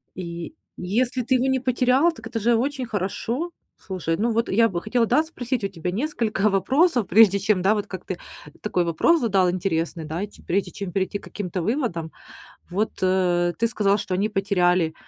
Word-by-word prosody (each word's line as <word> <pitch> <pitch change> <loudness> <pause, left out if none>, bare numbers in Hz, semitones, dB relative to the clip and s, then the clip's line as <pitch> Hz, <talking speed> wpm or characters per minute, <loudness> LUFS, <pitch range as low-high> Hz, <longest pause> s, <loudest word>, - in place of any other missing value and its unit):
И 170 - -6 0.2
если 240 +7 0
ты 255 +3 +2
его 255 +1 +2
не 265 -1 +2
потерял, 255 +5 +3
так 225 -9 -10
это 230 0 -3
же 235 +2 +3
очень 260 +2 -1
хорошо. 230 - -3 0.3
Слушай, 175 -4 -3
ну, 230 +3 +1
вот 230 +1 0
я 230 +3 +4
бы 175 -3 -3
хотела 230 +2 +1
да 305 +7 +3
спросить 255 -7 -4
у - - +1
тебя 180 -1 -4
несколько 215 - 0
вопросов, 245 - +2
прежде 200 -1 +6
чем, 200 -1 +1
да, 195 +3 +4
вот 205 - -3
как 185 -2 -8
ты 185 - -4 0.4
такой 180 -4 0
вопрос 170 - +3
задал 195 -6 +3
интересный, 170 -2 -2
да, 160 +4 -4
и - - -3
те 210 - -18
прежде 195 +3 -1
чем 200 -3 -6
перейти 195 +2 -1
к - - -23
каким-то 185 -3 -4
выводам. 190 - -2 0.6
Вот, 210 +5 -1
э, 180 -2 +2
ты 230 - +2
сказал, 205 -2 +2
что 190 - -3
они 200 +3 +1
потеряли 180 -5 +1
205 Hz, 195 wpm, -24 LUFS, 180-240 Hz, 0.6 s, прежде